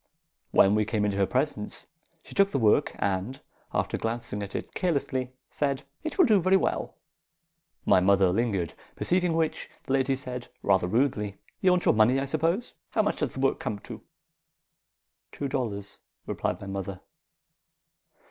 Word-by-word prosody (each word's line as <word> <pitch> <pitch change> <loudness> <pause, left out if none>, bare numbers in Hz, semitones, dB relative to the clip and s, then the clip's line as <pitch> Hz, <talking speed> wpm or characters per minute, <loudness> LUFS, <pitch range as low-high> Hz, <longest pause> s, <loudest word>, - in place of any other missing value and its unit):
When 100 - +5
we 105 0 +3
came 105 -1 0
into 100 -1 0
her 100 -1 +3
presence, 130 -5 -2 0.4
she - - -12
took 195 0 +4
the 140 - -1
work, 110 -5 +3
and, 100 +7 -1 0.3
after - - -1
glancing 115 -2 -3
at 100 -1 -6
it - - -5
carelessly, 135 -7 -1 0.2
said, 140 -2 -1 0.2
"'It 315 -2 -4
will 370 - +7
do 215 -7 +4
very 185 +2 +5
well.' - - -1 0.9
"My - - +6
mother 95 0 +4
lingered; 100 -7 0 0.2
perceiving 180 -1 +1
which, 160 -1 -1
the 135 - -2
lady 135 0 +2
said, 125 -2 -6 0.2
rather 95 -3 +3
rudely, 105 -2 0 0.2
"'You 190 - +4
want 180 -1 +2
your - - +5
money, 115 +5 +4
I 135 - -1
suppose. 165 - 0 0.2
How 215 - +2
much 210 - 0
does 150 -5 -2
the 130 - -3
work 135 - +2
come 105 - -3
to?' - - -9 1.3
"'Two 140 - -3
dollars,' 110 -7 -3 0.3
replied - - -2
my - - -8
mother. 95 -1 -5
125 Hz, 165 wpm, -27 LUFS, 100-145 Hz, 1.3 s, will